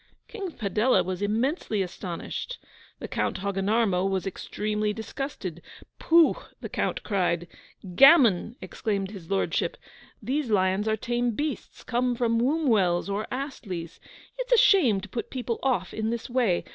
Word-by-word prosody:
King 390 -6 -6
Padella 220 +4 +2
was 185 +1 -4
immensely 220 - 0
astonished. 180 - -6 0.4
The - - -7
Count - - -1
Hogginarmo 200 0 +1
was 190 -1 -1
extremely 210 +2 -2
disgusted. 220 - -6 0.4
'Pooh!' 330 -1 +5 0.2
the - - -7
Count - - -2
cried. 175 -4 0 0.5
'Gammon!' 240 - +6
exclaimed 200 -3 -3
his 185 -6 -10
Lordship.' 195 - 0 0.4
These 260 +4 -2
lions 190 0 +2
are 220 0 +1
tame 240 +1 -1
beasts 295 +1 -4
come 245 0 0
from 230 -1 +1
Wombwell's 225 - +2
or 205 +2 -2
Astley's. 215 - -5 0.4
It - - -2
is - - +7
a - - +7
shame 320 - +4
to 210 - -8
put 230 +4 -5
people 245 -3 -3
off 220 -10 0
in 220 0 -2
this 235 0 -3
way. 235 -9 +2
220 Hz, 145 wpm, -26 LUFS, 195-255 Hz, 0.5 s, is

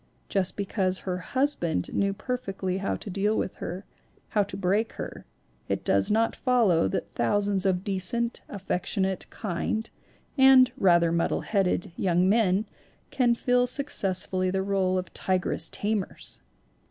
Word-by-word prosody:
Just 190 -2 -1
because 190 -2 -1
her 180 -1 -3
husband 255 - -1
knew 200 0 +1
perfectly 195 -4 -3
how 195 - -1
to - - -7
deal 205 +3 +1
with - - -3
her, 185 +4 -6 0.4
how 210 - +2
to 195 -1 -4
break 200 +4 0
her, - - -7 0.4
it - - -2
does 100 0 +2
not 225 +2 +2
follow 230 - +3
that 100 +1 -4
thousands 200 - +1
of 185 -1 +1
decent, 205 +5 -2
affectionate, 190 -1 -2
kind 215 +3 -3 0.5
(and 265 -1 +7
rather 170 -3 +4
muddle 170 0 0
headed) 190 -4 0
young 180 -1 +2
men 205 -1 +3 0.5
can 240 -3 +3
fill 245 +1 +2
successfully 190 -9 +1
the 190 +1 0
role 190 -1 +1
of 185 -1 -4
tigress 185 -3 0
tamers! 210 -2 -3
195 Hz, 140 wpm, -27 LUFS, 185-220 Hz, 0.5 s, and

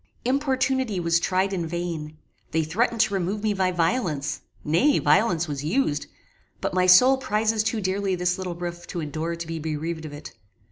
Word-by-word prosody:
Importunity 260 -4 +1
was 170 0 +2
tried 190 +2 0
in 170 -3 -2
vain: 160 -2 -4 0.3
they 160 0 +1
threatened 225 +8 +1
to 215 -3 +2
remove 195 +3 -1
me 215 -1 +2
by 190 -2 +1
violence 170 - -1 0.2
nay, 205 - +3
violence 170 +2 +3
was 145 -2 -4
used; 155 - 0 0.5
but - - -2
my 185 0 +2
soul 250 +9 +7
prizes 215 -2 +1
too 225 0 -1
dearly 190 0 0
this 180 +1 0
little 180 -2 -4
roof 175 0 -6
to 175 - -5
endure 160 +2 -3
to 170 0 -6
be 165 0 -5
bereaved 160 +1 -4
of 155 - -7
it. 145 +1 -9
180 Hz, 180 wpm, -25 LUFS, 160-215 Hz, 0.5 s, soul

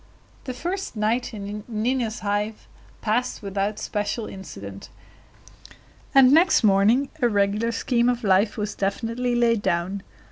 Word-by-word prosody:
The 255 - -4
first 360 +3 -4
night 220 +4 0
in 205 -1 -6
Nina's 230 0 -1
Hive 210 +1 -2 0.3
passed 235 +2 -1
without 200 +1 -2
special 210 +2 -2
incident; 100 - -9 1.3
and 265 -1 +8
next 325 -2 +5
morning 215 +7 +4
a 240 - +4
regular 205 +2 +1
scheme 240 +1 +1
of 245 0 -1
life 200 +1 +3
was 210 -1 -2
definitely 230 +5 -1
laid 230 -2 +2
down. 180 +3 -1
215 Hz, 130 wpm, -24 LUFS, 200-245 Hz, 1.3 s, and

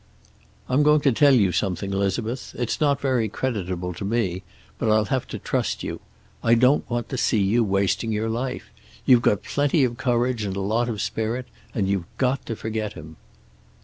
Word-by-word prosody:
"I'm 130 +3 +2
going 150 0 +5
to 140 - +4
tell 140 +3 +5
you 100 -6 +3
something, 95 +2 -1
Elizabeth. 110 +6 -2
It's 120 +3 -2
not 140 -2 +3
very 130 -6 +1
creditable 95 -7 -3
to 90 - -7
me, 100 -4 -1 0.4
but 110 - 0
I'll 110 0 +4
have 130 +4 -1
to - - -5
trust - - -2
you. - - -5 0.4
I 115 0 +5
don't 130 +5 +3
want 120 -1 -2
to 130 - -3
see - - +2
you 105 +4 +3
wasting 100 +2 0
your 110 +1 -1
life. 125 +3 -3 0.3
You've 125 -2 +6
got 105 -4 +2
plenty 145 +1 +1
of 120 -2 0
courage 125 -3 0
and 95 -2 -3
a - - -3
lot 110 +5 0
of 105 -3 -2
spirit. 115 +4 -2 0.3
And 100 -4 +1
you've 95 -3 0
got 130 +1 0
to 115 - -3
forget 110 -1 -3
him." 80 -1 -11
115 Hz, 190 wpm, -24 LUFS, 100-125 Hz, 0.4 s, You've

